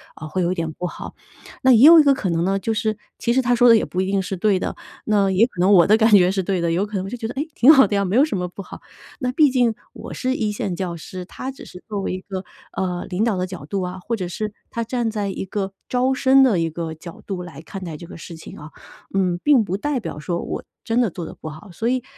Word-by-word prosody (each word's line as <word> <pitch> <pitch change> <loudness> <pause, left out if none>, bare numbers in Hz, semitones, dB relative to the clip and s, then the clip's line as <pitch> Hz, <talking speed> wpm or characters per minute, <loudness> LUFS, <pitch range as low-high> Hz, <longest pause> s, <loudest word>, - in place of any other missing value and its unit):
哦， 155 - -8
会 180 +4 -1
有 175 - +1
一 - - -1
点 165 -3 -3
不 180 - -6
好。 180 - -7 0.5
那 260 - +6
也 235 - +6
有 335 -1 +10
一 - - +7
个 280 -1 +5
可 235 -8 -2
能 165 0 0
呢， 195 +2 +1
就 225 +3 -2
是 215 0 0 0.2
其 235 - 0
实 265 - +3
他 245 -1 +2
说 245 +1 +5
的 230 - +8
也 220 - +2
不 180 - -2
一 - - 0
定 195 - +1
是 190 0 -4
对 195 0 +2
的， - - -3 0.3
那 200 -3 +2
也 200 +5 +4
可 210 - -13
能 190 +3 +4
我 175 -3 +7
的 215 - +6
感 220 0 +4
觉 180 -3 +6
是 195 0 0
对 190 0 -1
的， 170 - 0
有 190 +4 +1
可 210 0 -8
能 185 - -3
我 - - -6
就 245 - -5
觉 230 - -6
得， 230 - -6
哎， - - -2
挺 260 +6 +7
好 270 - +7
的 205 - -1
呀， 200 - +2
没 190 +3 -1
有 275 - +6
什 260 -11 -3
么 180 - -2
不 195 - -9
好。 - - -11 0.4
那 250 -3 -1
毕 295 0 +5
竟 245 -3 +2 0.2
我 - - -9
是 260 0 -1
1 215 -4 -1
线 200 -3 -3
教 175 -1 -3
师， 180 +3 -8
他 260 +7 -7
只 270 - -13
是 180 - -12
作 205 -2 -3
为 - - -2
一 185 - -4
个， 190 -1 -6 0.3
呃， 180 -2 -2
领 195 +3 -1
导 220 -5 +1
的 180 - -1
角 180 -7 -8
度 195 +6 -3
啊， 180 0 -5
或 230 +6 -3
者 185 -3 -3
是 210 +3 -4 0.2
他 230 - -3
站 235 0 -1
在 205 -2 -2
一 195 - -4
个 195 0 -3 0.2
招 255 +1 +1
生 265 0 +4
的 225 -9 +3
一 165 0 0
个 160 0 -5
角 165 +1 -11
度， 185 -3 -4
来 160 -4 -10
看 190 +3 -8
待 165 -3 -6
这 170 - -10
个 - - -10
事 170 +1 -9
情 160 - -11
啊。 150 +1 -10 0.4
嗯， 180 -2 +1
并 285 -6 +5
不 190 -1 -3
代 280 +4 -1
表 150 - -6
说 170 +2 -3
我 - - -5 0.2
真 230 +1 0
的 235 - +2
做 175 0 -7
得 - - -8
不 - - -10
好， 160 +7 -11
所 225 +7 -3
以 255 0 0
195 Hz, 320 characters per minute, -21 LUFS, 180-230 Hz, 0.5 s, 有